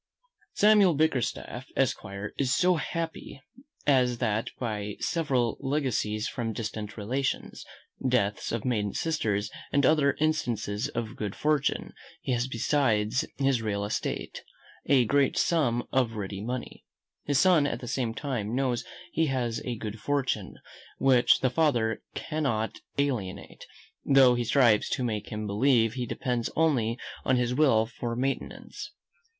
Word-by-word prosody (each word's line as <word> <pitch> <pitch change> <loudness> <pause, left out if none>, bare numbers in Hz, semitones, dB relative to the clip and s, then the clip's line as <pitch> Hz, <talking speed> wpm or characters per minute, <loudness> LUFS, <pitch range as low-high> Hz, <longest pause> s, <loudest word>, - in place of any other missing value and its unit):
Samuel 205 -5 +5
Bickerstaff, 140 -5 -1
esquire, 100 +1 -2
is 135 -3 +1
so 180 -1 +3
happy 165 -2 -4 0.5
as 125 -4 +3
that 110 0 -1
by 105 -4 -3
several 130 -9 0
legacies 130 -6 -1
from 115 -3 -3
distant 110 -2 -5
relations, 130 +6 -2 0.5
deaths 105 -5 0
of 115 -2 -3
maiden 105 -5 0
sisters, 110 -11 -1 0.2
and 140 -1 +3
other 140 -1 +4
instances 125 -9 0
of 115 0 -4
good 105 -2 -4
fortune, 150 -2 0 0.3
he - - -4
has 120 0 +1
besides 120 -3 +1
his 135 -4 +2
real 100 -2 -1
estate, 105 - -3 0.4
a 130 -4 +5
great 140 +4 +2
sum 120 -8 +2
of 125 -4 +1
ready 100 -2 -5
money. 125 +2 -5 0.4
His 145 -2 +1
son 165 -2 +5
at - - -3
the 120 - -8
same 120 -1 -2
time 120 -6 -3
knows 130 -3 0 0.3
he 160 0 +1
has 120 -4 -1
a 120 -2 -3
good 110 0 -6
fortune, 140 +1 -1 0.4
which 130 -2 +4
the 130 -2 +2
father 125 -7 +1
cannot 135 -9 -2 0.2
alienate; 125 -10 -3 0.4
though 135 -2 +6
he 120 0 -1
strives 115 -4 +4
to 130 - -1
make 105 -3 -2
him 105 0 -3
believe 115 +2 +3
he 125 -1 -3
depends 120 0 -2
only 125 -8 +2 0.3
on 130 - +2
his 125 0 0
will 125 -6 +4
for 120 -1 -5
maintenance. 135 +3 -4
125 Hz, 140 wpm, -28 LUFS, 110-140 Hz, 0.5 s, though